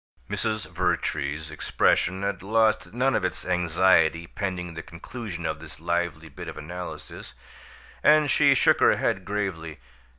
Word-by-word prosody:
Mrs. 110 -1 -2
Vertrees's 80 -4 -1
expression 95 +4 +1
had 100 0 -2
lost 110 -3 +2
none 130 +3 +1
of - - +1
its 90 - -3
anxiety 85 -2 +3
pending 90 -2 -4
the 80 - -6
conclusion 85 +1 -7
of 80 0 -2
this 80 -1 -12
lively 85 -1 -2
bit 70 - -9
of - - -7
analysis, 90 +4 -8 0.7
and 150 -2 +5
she 140 -2 +5
shook - - +4
her - - +5
head 95 - 0
gravely. 95 -6 -3
90 Hz, 140 wpm, -26 LUFS, 80-105 Hz, 0.7 s, and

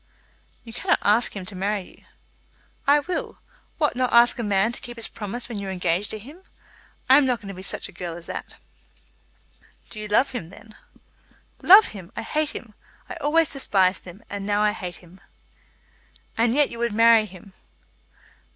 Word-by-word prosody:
"You 230 -2 -11
cannot - - +1
ask 215 +3 +3
him 190 -2 -6
to 190 - -9
marry 200 +2 -1 0.2
you." - - -28 0.8
"I 290 +1 +5
will. 350 +4 -4 0.4
What, 300 -4 +1
not 255 0 0
ask 235 +1 +5
a - - -1
man 205 +1 +1
to - - -9
keep 240 -1 -10
his 230 - -6
promise 220 +3 -5
when 230 -4 -5
you 200 - -5
are - - -3
engaged 180 +1 -1
to 220 - -4
him? 285 - -13 0.7
I 265 - +7
am 290 - +2
not 250 -2 +1
going 200 -3 -10
to - - -6
be 185 - -9
such 190 - -3
a - - -13
girl 175 -2 -6
as 170 - -11
that." - - -7 1.4
"Do 215 - -8
you 210 - -6
love 210 +7 +3
him, 210 -11 -6
then?" 210 +3 -15 0.9
"Love 400 +4 +8
him! 190 -5 -11
I 225 - -4
hate 305 +6 -1
him. 230 -7 -9 0.4
I - - -5
always 320 +1 +2
despised 190 -8 +1
him, 185 +5 -12
and 200 0 -6
now 205 +1 +1
I 210 - +3
hate 180 -3 -6
him." 180 +3 -18 1.1
"And 230 +1 +2
yet 295 0 +3
you 235 - -8
would 235 -2 -1
marry 225 0 +5
him?" 190 0 -15
215 Hz, 195 wpm, -24 LUFS, 195-245 Hz, 1.4 s, Love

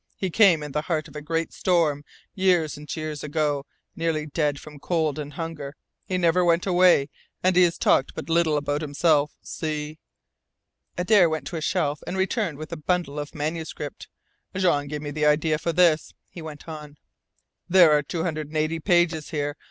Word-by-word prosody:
He 190 -2 -2
came 175 -6 +5
in 150 - -6
the 150 - -1
heart 155 -2 -2
of - - -16
a 150 - -5
great 165 +2 -2
storm, 160 -6 +1 0.3
years 180 -5 +2
and 150 0 -7
years 155 -2 -5
ago, 150 -2 -1 0.3
nearly 160 -2 -1
dead 150 -1 -1
from 150 -1 -12
cold 155 -1 -1
and 145 -1 -6
hunger. 150 -3 -6 0.3
He 185 - -1
never 180 0 +3
went 170 0 +2
away, 180 -6 +4 0.3
and 185 0 +3
he 180 - +6
has 170 - -1
talked 135 - +2
but - - -6
little 165 -2 +2
about 145 +1 -1
himself. 150 0 +1
See 155 -1 -4 0.5
" - - -48
Adare 180 -1 +4
went 155 0 -3
to 175 - -7
a 160 - -3
shelf 150 -4 0
and 190 - -3
returned 190 - -1
with 155 +2 -8
a 170 - -4
bundle 155 -2 -1
of 145 0 -7
manuscript. 155 -1 -5 0.5
"Jean 170 -6 +1
gave 150 +1 -5
me 145 - -4
the 150 0 +1
idea 155 +1 +2
for 170 - -1
this," 165 -3 +2
he 170 - -10
went 155 -1 -9
on. 150 -2 -9 0.7
There 175 -3 +7
are 150 -1 +4
two 160 +3 -4
hundred 155 -3 -3
and 155 +1 -5
eighty 155 +1 0
pages 175 -3 +1
here. 145 -1 -2
155 Hz, 190 wpm, -24 LUFS, 150-170 Hz, 0.7 s, There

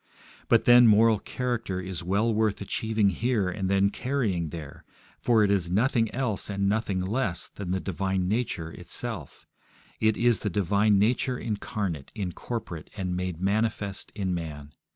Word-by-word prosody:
But, - - +4
then, 120 0 +8
moral 110 0 +5
character 120 -7 -3
is 95 -2 -5
well 100 +6 +1
worth 110 -1 +1
achieving 110 +1 0
here 110 0 0
and 95 0 -2
then 100 0 +3
carrying 105 - -1
there, 75 -3 -9 0.4
for 115 -3 +3
it 100 - +3
is 95 -4 +1
nothing 115 +3 +2
else 120 -7 -2
and 100 -1 0
nothing 100 -2 0
less 95 -3 -1
than 100 -3 -7
the 95 +1 0
divine 95 0 -1
nature 100 -6 -2
itself; 90 - -6 0.5
it 110 -1 +2
is 120 -2 +3
the 105 - -2
divine 100 +2 +2
nature 125 +4 +1
incarnate, 100 - -3
incorporate, 95 -3 -5
and 90 -2 -2
made 90 -2 -3
manifest 100 0 -1
in 95 -3 -1
man. 75 -4 -6
100 Hz, 150 wpm, -27 LUFS, 90-110 Hz, 0.5 s, then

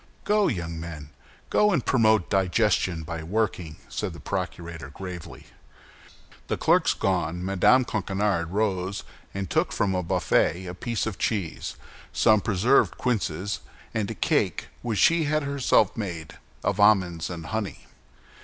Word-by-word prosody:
"Go, 210 0 +3
young 85 - -3
men! 80 -3 -8 0.4
go 210 0 +4
and 155 - 0
promote 110 -6 +3
digestion 95 -3 +1
by 80 0 -5
working," 90 -3 -2
said - - -4
the - - -10
procurator, 85 -5 -5
gravely. 90 +2 -8 1.0
The - - -1
clerks - - +3
gone, 90 -2 -1
Mme. 100 +7 +4
Coquenard 95 -4 -1
rose 100 -1 -1 0.3
and 100 -1 -2
took - - +1
from 95 -1 0
a 90 - 0
buffet 85 +1 +1
a 90 - -5
piece 115 +5 -2
of 110 -4 -4
cheese, 100 -7 -2 0.4
some 110 -1 +4
preserved 110 +7 +3
quinces, 100 -5 -1 0.3
and 110 -3 -1
a - - -4
cake - - 0
which 115 -3 -2
she 170 +5 +4
had 155 +1 +1
herself 140 -7 +2
made 85 -8 -6 0.2
of 100 +1 0
almonds 90 -5 +3
and 85 -2 -6
honey. 110 +1 -4
95 Hz, 140 wpm, -26 LUFS, 85-110 Hz, 1.0 s, go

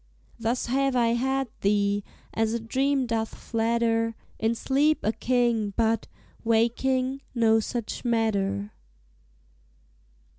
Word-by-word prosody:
Thus 230 +2 -1
have 270 +2 +1
I 235 -2 +3
had 265 +3 0
thee, 205 0 +1 0.3
as 225 0 +1
a 235 - 0
dream 265 +4 0
doth 225 -2 -2
flatter; 230 0 0 0.2
In 225 +1 +1
sleep 285 +6 +2
a 215 - +2
king, 235 -4 0
but, 225 -1 +1 0.4
waking, 255 +4 +1
no 225 -1 +4
such 230 0 -4
matter. 200 - 0
230 Hz, 110 wpm, -26 LUFS, 225-255 Hz, 0.4 s, no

